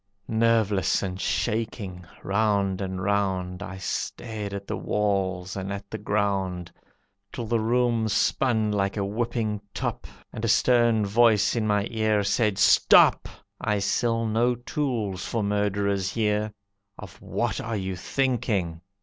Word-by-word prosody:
Nerveless 110 -4 +2
and 95 -1 -4
shaking, 100 -5 -2 0.2
round 100 -2 +1
and 95 -1 -4
round, 95 -2 -1
I 95 -2 -6
stared 105 +2 -4
at 100 0 -6
the - - -3
walls 95 -3 -1
and 95 0 -4
at 100 0 -7
the 110 - -4
ground, 95 -4 -1 0.6
Till 120 - -5
the 115 +1 0
room 115 0 +1
spun 110 0 +1
like 100 0 -1
a 100 - 0
whipping 110 0 -2
top, - - -3 0.3
And 110 - -6
a - - +1
stern 120 -2 +3
voice 110 +1 +3
in 110 -2 0
my 105 -1 +2
ear 110 -2 +1
said, 105 0 +1
"Stop! 100 -2 +5 0.3
I 105 - 0
sell 115 +3 0
no 115 +3 +2
tools 120 -7 -3
for 115 -2 -2
murderers 100 -1 0
here. 105 -1 0 0.5
Of - - -11
what - - -2
are 110 -1 -3
you 95 -1 -3
thinking! 100 -7 -1
105 Hz, 140 wpm, -25 LUFS, 95-115 Hz, 0.6 s, Stop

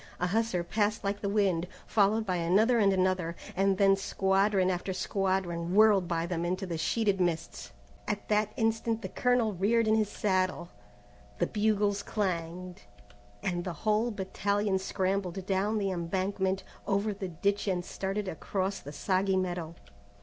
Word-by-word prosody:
A 180 - +1
hussar 200 -2 0
passed 210 +4 0
like 200 0 -2
the 200 - -1
wind, 190 -5 +1 0.2
followed 215 +1 +2
by 185 -3 0
another 205 +8 +3
and 200 -2 +4
another, 185 -3 +1 0.2
and 195 0 +2
then 195 0 +5
squadron 195 0 +1
after 185 +1 -3
squadron 185 -2 -1
whirled 210 -4 +5
by 165 -1 -1
them 170 -1 -2
into 185 +3 -1
the 175 -2 -4
sheeted 200 +3 +1
mists. 170 -2 -2 0.4
At 210 -1 -3
that 215 0 +2
instant 225 -1 0
the - - -4
colonel 245 -4 +1
reared 215 +5 +2
in 215 - +4
his 215 -2 +2
saddle, 185 -3 0 0.7
the - - +2
bugles 205 -2 +1
clanged, 180 - -3 0.6
and 175 -2 -1
the 180 -1 -4
whole 215 +2 +2
battalion 200 -1 -1
scrambled 190 -1 -2
down 195 +3 0
the 200 -2 0
embankment, 190 +2 -1 0.2
over 205 +1 +1
the 195 -1 -5
ditch 200 +5 -1
and 180 -2 0
started 195 +2 -3
across 190 +2 -2
the 145 - -9
soggy 190 +4 +1
meadow. 175 -3 -3
195 Hz, 155 wpm, -30 LUFS, 180-210 Hz, 0.7 s, then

